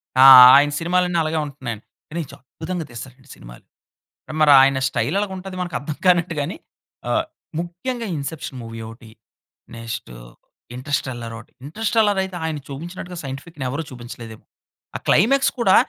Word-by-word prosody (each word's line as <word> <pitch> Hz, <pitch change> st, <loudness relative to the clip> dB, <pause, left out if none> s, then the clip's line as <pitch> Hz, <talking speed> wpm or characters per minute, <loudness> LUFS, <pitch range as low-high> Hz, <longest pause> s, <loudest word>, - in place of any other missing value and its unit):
ఆ! 130 Hz, -, +6 dB, 0.3 s
ఆయన 145 Hz, +1 st, +5 dB
సినిమాలన్ని 180 Hz, 0 st, +1 dB
అలాగే 155 Hz, 0 st, -1 dB
ఉంటున్నాయండి. 130 Hz, -7 st, -7 dB, 0.2 s
కానీ 170 Hz, +2 st, -4 dB
చాలా 140 Hz, -, -15 dB
అద్భుతంగా 170 Hz, +1 st, -5 dB
తీస్తాడండి 130 Hz, +3 st, -11 dB
సినిమాలు. -, -, -14 dB, 0.8 s
మరి 150 Hz, -1 st, +6 dB
ఆయన 135 Hz, 0 st, +3 dB
స్టైల్ 165 Hz, -, -1 dB
అలగుంటది 190 Hz, -2 st, -5 dB
మనకర్థం 160 Hz, -4 st, -4 dB
కానట్టు 175 Hz, -1 st, +3 dB
గాని, 145 Hz, -, -3 dB, 0.5 s
ఆహ్, -, -, +1 dB, 0.3 s
ముఖ్యంగా 215 Hz, +8 st, -4 dB
'ఇన్సెప్షన్' 140 Hz, -2 st, -6 dB
మూవీ 115 Hz, 0 st, -8 dB
ఒకటి. 115 Hz, 0 st, -13 dB, 0.7 s
నెక్స్ట్, 115 Hz, -, -7 dB, 0.7 s
'ఇంటర్స్టెల్లార్' 125 Hz, -4 st, -4 dB
ఒకటి. 115 Hz, -, -14 dB, 0.2 s
'ఇంటర్స్టెల్లార్' 215 Hz, +2 st, +1 dB
అయితే, 190 Hz, -1 st, -7 dB
ఆయన 160 Hz, -2 st, -2 dB
చూపించినట్టుగా 175 Hz, +5 st, -8 dB
సైంటిఫిక్‌ని 140 Hz, +2 st, -7 dB
ఎవరూ 145 Hz, +5 st, -3 dB
చూపించలేదేమో. 120 Hz, -2 st, -10 dB, 0.5 s
ఆ -, -, -12 dB
క్లైమాక్స్ 270 Hz, -, +4 dB
కూడా, 195 Hz, -5 st, +4 dB
150 Hz, 130 wpm, -21 LUFS, 130-180 Hz, 0.8 s, ఆ